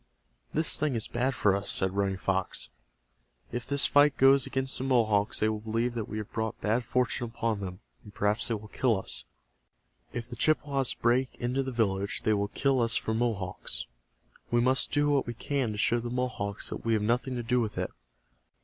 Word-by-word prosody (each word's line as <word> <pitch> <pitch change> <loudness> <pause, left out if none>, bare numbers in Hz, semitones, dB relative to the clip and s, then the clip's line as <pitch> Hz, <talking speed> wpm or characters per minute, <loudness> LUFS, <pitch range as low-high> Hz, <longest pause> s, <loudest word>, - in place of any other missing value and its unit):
"This 155 +1 +3
thing 150 -4 0
is 115 - -2
bad 125 +2 -1
for 100 -5 +3
us," 100 0 -3
said 95 0 +1
Running 100 -1 0
Fox. 95 -1 -2 0.8
"If 120 0 -4
this 140 0 +3
fight 145 0 +4
goes 135 0 +5
against 130 0 0
the - - -3
Mohawks 110 -6 +2
they 110 - +4
will 110 -1 -1
believe 115 +3 -1
that 115 -3 -4
we 110 - -4
have 105 -1 -6
brought 110 -1 -3
bad 115 +4 0
fortune 125 0 0
upon 115 -2 -2
them, 90 -2 -6 0.2
and 105 - -12
perhaps 105 +2 +1
they 115 - 0
will 110 0 -8
kill 115 -4 +1
us. - - -5 0.9
If 120 -1 -5
the 120 - -8
Chippewas 140 -1 +1
break 125 +2 +1
into 125 +3 -1
the 135 0 -3
village 100 -4 -1
they 110 - +3
will 100 -1 0
kill 135 +4 +1
us 115 -1 +6
for 110 - 0
Mohawks. 100 - -1 0.6
We 120 - +2
must 130 +2 +2
do 145 0 +2
what 140 -3 +1
we 120 - -4
can 135 -2 -1
to - - -6
show 120 +3 +2
the 120 0 -5
Mohawks 120 -5 -3
that - - -6
we 115 - +1
have 105 -1 +1
nothing 125 +4 0
to 120 - -3
do 125 +2 +1
with 110 -2 -3
it." - - -2
115 Hz, 205 wpm, -29 LUFS, 105-130 Hz, 0.9 s, us